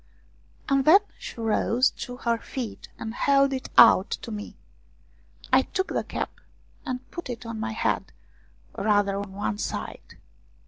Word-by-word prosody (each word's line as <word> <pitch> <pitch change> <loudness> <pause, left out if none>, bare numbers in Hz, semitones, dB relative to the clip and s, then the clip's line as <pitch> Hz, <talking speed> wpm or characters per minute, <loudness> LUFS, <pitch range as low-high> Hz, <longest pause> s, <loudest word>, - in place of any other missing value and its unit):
And 275 -1 +3
then 345 +9 +7 0.2
she - - -8
rose 230 +3 +2
to 245 -1 -7
her 235 -2 0
feet 240 -4 -6
and 220 - -5
held 275 +2 +3
it 260 - -4
out 225 -4 +8
to 230 - -5
me. 210 -1 -7 1.0
I - - +7
took 380 0 -3
the - - -1
cap, - - -4 0.6
and 255 -1 -4
put 345 -6 -7
it 240 -1 -6
on 230 -1 -5
my 220 0 -3
head, 225 - -1 0.6
rather 205 -2 +2
on 200 -1 -5
one 105 - -3
side. - - -5
235 Hz, 150 wpm, -26 LUFS, 215-265 Hz, 1.0 s, out